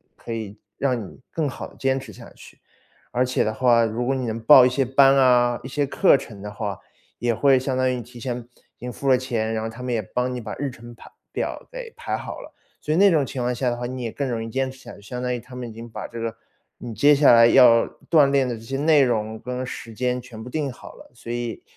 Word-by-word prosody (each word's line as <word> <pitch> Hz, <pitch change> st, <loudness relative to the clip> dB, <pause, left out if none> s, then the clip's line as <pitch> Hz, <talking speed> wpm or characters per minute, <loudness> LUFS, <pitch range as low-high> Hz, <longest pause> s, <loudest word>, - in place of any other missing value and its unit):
可 115 Hz, -, -10 dB
以 110 Hz, -2 st, -5 dB, 0.2 s
让 130 Hz, -3 st, 0 dB
你 -, -, -14 dB
更 160 Hz, -3 st, -2 dB
好 -, -, -7 dB
地 -, -, -19 dB
坚 135 Hz, 0 st, 0 dB
持 -, -, -11 dB
下 -, -, -13 dB
去。 -, -, -15 dB, 0.5 s
而 125 Hz, +1 st, +1 dB
且 125 Hz, -, 0 dB
的 110 Hz, -, -1 dB
话， 120 Hz, 0 st, +4 dB
如 115 Hz, +2 st, -2 dB
果 135 Hz, -, +1 dB
你 130 Hz, -1 st, -2 dB
能 115 Hz, 0 st, -3 dB
报 125 Hz, +3 st, +8 dB
一 -, -, +4 dB
些 135 Hz, +1 st, 0 dB
班 135 Hz, +1 st, +5 dB
啊， 120 Hz, -2 st, +4 dB
一 130 Hz, -, -8 dB
些 145 Hz, +2 st, -1 dB
课 175 Hz, +6 st, +4 dB
程 110 Hz, -7 st, -6 dB
的 105 Hz, -, -6 dB
话， 105 Hz, -2 st, -5 dB, 0.4 s
也 120 Hz, -1 st, 0 dB
会 135 Hz, +2 st, +4 dB
相 130 Hz, 0 st, -2 dB
当 130 Hz, 0 st, +2 dB
于 125 Hz, -, -4 dB
提 120 Hz, +1 st, -13 dB
前 120 Hz, 0 st, -3 dB, 0.4 s
已 -, -, -52 dB
经 125 Hz, -, -6 dB
付 135 Hz, +2 st, -3 dB
了 130 Hz, -, +6 dB
钱， 115 Hz, -3 st, -2 dB
然 110 Hz, -, -2 dB
后 110 Hz, -, -3 dB
他 115 Hz, +3 st, -10 dB
们 125 Hz, -1 st, -2 dB
也 110 Hz, -, 0 dB
帮 125 Hz, +5 st, -2 dB
你 125 Hz, -, -4 dB
把 110 Hz, -3 st, -6 dB
日 140 Hz, +1 st, -2 dB
程 120 Hz, 0 st, -12 dB
排 -, -, -15 dB, 0.2 s
表 -, -, -4 dB
给 -, -, -8 dB
排 -, -, -3 dB
好 -, -, -7 dB
了。 -, -, -12 dB, 0.3 s
所 155 Hz, -, -2 dB
以 -, -, +1 dB
那 200 Hz, 0 st, +6 dB
种 150 Hz, -4 st, +2 dB
情 130 Hz, -, -5 dB
况 125 Hz, +1 st, 0 dB
下 125 Hz, +1 st, -1 dB
的 120 Hz, -, -2 dB
话， 120 Hz, 0 st, -5 dB
你 130 Hz, 0 st, -5 dB
也 115 Hz, -, -2 dB
更 140 Hz, -2 st, -3 dB
容 115 Hz, -2 st, -2 dB
易 115 Hz, -, -5 dB
坚 130 Hz, +2 st, -1 dB
持 130 Hz, -, -15 dB
下 -, -, -11 dB
去， -, -, -16 dB
相 125 Hz, +5 st, -6 dB
当 125 Hz, 0 st, -1 dB
于 -, -, -3 dB
他 125 Hz, +2 st, -13 dB
们 125 Hz, -1 st, -6 dB
已 -, -, -10 dB
经 115 Hz, +1 st, -10 dB
把 110 Hz, -1 st, -7 dB
这 115 Hz, -, -10 dB
个 115 Hz, -1 st, -3 dB, 0.5 s
你 120 Hz, -2 st, -7 dB
接 145 Hz, +8 st, +5 dB
下 140 Hz, -2 st, +6 dB
来 115 Hz, 0 st, +8 dB
要 120 Hz, -2 st, +6 dB, 0.2 s
锻 150 Hz, -4 st, +5 dB
炼 140 Hz, -2 st, +2 dB
的 120 Hz, -, -3 dB
这 110 Hz, -, -11 dB
些 135 Hz, +4 st, -4 dB
内 150 Hz, +1 st, +4 dB
容 110 Hz, -4 st, 0 dB
跟 125 Hz, +2 st, -4 dB
时 115 Hz, -2 st, -8 dB
间 125 Hz, +1 st, -1 dB
全 115 Hz, -3 st, -11 dB
部 -, -, -10 dB
定 140 Hz, +1 st, -2 dB
好 120 Hz, -, -12 dB
了。 -, -, -16 dB
所 115 Hz, 0 st, -8 dB
以 120 Hz, -1 st, -4 dB
125 Hz, 300 characters per minute, -23 LUFS, 115-135 Hz, 0.5 s, 报